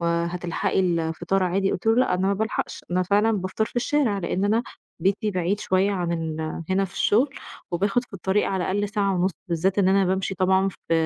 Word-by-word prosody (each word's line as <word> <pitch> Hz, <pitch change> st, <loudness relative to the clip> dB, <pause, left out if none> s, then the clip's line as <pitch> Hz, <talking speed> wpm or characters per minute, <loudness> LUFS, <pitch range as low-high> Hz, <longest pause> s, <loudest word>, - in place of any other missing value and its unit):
وهتلحقي 170 Hz, +1 st, -1 dB
الفطار 175 Hz, +1 st, 0 dB
عادي، 195 Hz, +2 st, +1 dB
قُلت 180 Hz, -, -5 dB
له 225 Hz, -, +5 dB
لأ، 250 Hz, -7 st, +3 dB
أنا 185 Hz, +1 st, 0 dB
ما 200 Hz, -, +2 dB
بالحقش، 220 Hz, +2 st, -3 dB
أنا 180 Hz, +1 st, +2 dB
فعلًا 205 Hz, +4 st, +2 dB
بافطر 190 Hz, +1 st, -1 dB
في 220 Hz, -, -12 dB
الشارع، 240 Hz, -4 st, +1 dB
لإن 185 Hz, +1 st, -1 dB
أنا 220 Hz, +3 st, +2 dB, 0.4 s
بيتي 200 Hz, +5 st, +1 dB
بعيد 185 Hz, +2 st, -1 dB
شوية 190 Hz, +2 st, +2 dB
عن 175 Hz, -3 st, -1 dB
ال 160 Hz, -1 st, -3 dB, 0.3 s
هنا 195 Hz, +1 st, +2 dB
في 185 Hz, -, -9 dB
الشغل، 245 Hz, +7 st, +3 dB, 0.4 s
وباخد 200 Hz, +7 st, +1 dB
في -, -, -34 dB
الطريق 195 Hz, +2 st, 0 dB
على 190 Hz, -1 st, -1 dB
الأقل 205 Hz, +2 st, 0 dB
ساعة 200 Hz, -1 st, 0 dB
ونص، 180 Hz, +1 st, +1 dB, 0.2 s
بالذات 180 Hz, +4 st, 0 dB
إن 190 Hz, -2 st, +4 dB
أنا 195 Hz, 0 st, +4 dB
بامشي 190 Hz, +1 st, -1 dB
طبعًا 190 Hz, +1 st, +2 dB, 0.2 s
ف -, -, +3 dB
190 Hz, 200 wpm, -24 LUFS, 180-205 Hz, 0.4 s, له